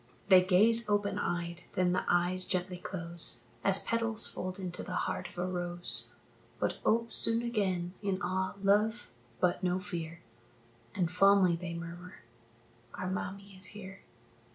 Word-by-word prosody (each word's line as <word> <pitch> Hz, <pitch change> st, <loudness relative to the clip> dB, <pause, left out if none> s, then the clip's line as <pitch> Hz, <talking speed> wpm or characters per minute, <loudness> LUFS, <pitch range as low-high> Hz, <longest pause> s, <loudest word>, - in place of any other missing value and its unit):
They 185 Hz, -1 st, +8 dB
gaze 215 Hz, +5 st, +4 dB
open 205 Hz, -1 st, +1 dB
eyed, 175 Hz, 0 st, -3 dB
then 180 Hz, -1 st, +2 dB
the 180 Hz, -, +1 dB
eyes 180 Hz, +1 st, +3 dB
gently 180 Hz, -1 st, -1 dB
close, 170 Hz, -9 st, -1 dB, 0.2 s
As 195 Hz, 0 st, +2 dB
petals 230 Hz, -1 st, +1 dB
fold 185 Hz, +1 st, -3 dB
into 180 Hz, -2 st, -3 dB
the -, -, -5 dB
heart -, -, -3 dB
of -, -, -17 dB
a 175 Hz, -, -1 dB
rose, 175 Hz, -1 st, -1 dB, 0.5 s
But -, -, -1 dB
ope 230 Hz, 0 st, +1 dB
soon 230 Hz, +1 st, +1 dB
again 190 Hz, -7 st, -1 dB
in 195 Hz, -2 st, -1 dB
awe, 190 Hz, +2 st, -1 dB
love, 210 Hz, -, +2 dB, 0.3 s
but 175 Hz, -1 st, +2 dB
no 180 Hz, -1 st, +1 dB
fear, 170 Hz, -4 st, -5 dB, 0.7 s
And 180 Hz, -4 st, 0 dB
fondly 190 Hz, -1 st, +5 dB
they 170 Hz, 0 st, -5 dB
murmur, 170 Hz, +2 st, -8 dB, 0.7 s
"Our 185 Hz, 0 st, -3 dB
mammie 195 Hz, +1 st, -5 dB
is 185 Hz, -1 st, -1 dB
here." 190 Hz, -2 st, -9 dB
185 Hz, 150 wpm, -32 LUFS, 175-200 Hz, 0.7 s, They